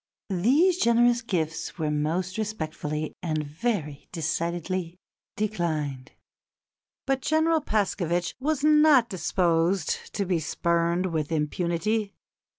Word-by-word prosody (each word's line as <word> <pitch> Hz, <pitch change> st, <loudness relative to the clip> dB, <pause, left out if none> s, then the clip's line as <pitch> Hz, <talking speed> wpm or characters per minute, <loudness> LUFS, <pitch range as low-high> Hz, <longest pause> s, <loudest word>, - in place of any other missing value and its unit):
These 285 Hz, -, +3 dB
generous 235 Hz, +1 st, +4 dB
gifts 165 Hz, -7 st, -3 dB
were 155 Hz, -3 st, -1 dB
most 170 Hz, +6 st, -1 dB
respectfully 155 Hz, -7 st, -3 dB
and 155 Hz, -3 st, -1 dB
very 150 Hz, -2 st, -3 dB
decidedly 170 Hz, +1 st, -2 dB, 0.4 s
declined." 155 Hz, -10 st, -2 dB, 0.9 s
But 270 Hz, 0 st, 0 dB
General 315 Hz, +2 st, +2 dB
Paskevitch 180 Hz, -, 0 dB
was 290 Hz, +1 st, -1 dB
not 300 Hz, -5 st, +5 dB
disposed 175 Hz, -1 st, 0 dB
to 200 Hz, -, 0 dB
be 180 Hz, -2 st, +1 dB
spurned 170 Hz, +3 st, 0 dB
with 155 Hz, -1 st, -1 dB
impunity. 175 Hz, +7 st, -1 dB
175 Hz, 100 wpm, -26 LUFS, 160-225 Hz, 0.9 s, not